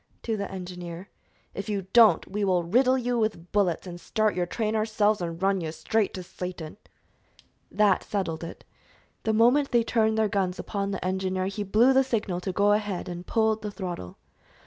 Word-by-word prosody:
to 225 - -1
the 200 -1 -4
engineer. 180 -1 -7 0.4
"If 200 +2 -5
you 200 -3 -2
don't, 225 -8 +6
we 205 +2 -3
will 185 -3 +2
riddle 255 +9 +3
you 245 -1 -1
with 210 -6 -2
bullets 195 -5 +1
and 175 -1 -8
start 215 -1 0
your 180 -1 -1
train 220 +3 -2
ourselves 215 -2 +1
and 165 -1 -4
run 195 0 +1
you 160 -2 -3
straight 195 +7 0
to 185 - -6
Satan!" 180 -2 -7 0.9
That 210 -3 +3
settled 170 -6 -3
it. 165 - -8 0.6
The 220 - +2
moment 245 +6 +4
they 235 -1 +3
turned 220 -1 +1
their 220 -1 +3
guns 190 -3 -1
upon 200 -1 -3
the 195 -2 -4
engineer 185 0 -1
he 195 +2 -4
blew 220 +6 +4
the 265 0 +5
signal 210 -8 -2
to 190 - -3
go 205 +2 +3
ahead, 205 -3 -1
and 175 0 -7
pulled 220 -1 +1
the 210 - -4
throttle. 180 - -6
200 Hz, 190 wpm, -26 LUFS, 180-220 Hz, 0.9 s, don't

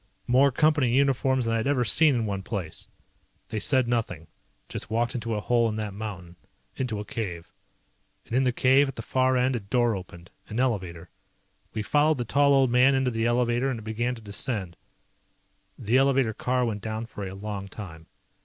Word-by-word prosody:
More 135 +3 +4
Company 150 -1 +2
uniforms 130 0 +2
than 115 - 0
I - - +2
had 115 - -1
ever 135 -4 +1
seen 150 +5 +5
in 115 -2 0
one 100 -2 -3
place. 95 -5 -5 0.6
They 110 - -3
said 130 +1 +3
nothing. 115 -9 -2 0.4
Just - - -5
walked 120 +2 0
into 115 -2 -3
a - - -1
hole 115 +1 +2
in 105 - -4
that 105 -2 -4
mountain. 95 -5 -7 0.4
Into 120 -5 -3
a 105 - -6
cave. 90 -5 -6 0.7
And - - -10
in 130 - +3
the 125 - +2
cave, 130 +3 +4
at 135 - -6
the - - -6
far 130 0 +1
end, 125 +1 +1
a - - -1
door 115 +2 +1
opened. 90 -2 -10 0.2
An 110 - -4
elevator. 90 -9 -2 0.6
We 110 - -2
followed 150 +5 +2
the 120 - -3
tall 140 +4 +3
old 135 -2 +3
man 130 +2 +5
into 130 -1 +1
the 115 0 0
elevator 120 +2 +1
and 130 - -2
it - - -11
began 120 +3 -2
to 115 - -12
descend. 100 -3 -3 1.0
The 115 +5 +1
elevator 135 -4 +2
car 125 +3 0
went 105 -3 -3
down 110 +1 -4
for 105 -3 -7
a 95 - -8
long 100 -1 -6
time. 90 -5 -10
115 Hz, 200 wpm, -26 LUFS, 105-130 Hz, 1.0 s, seen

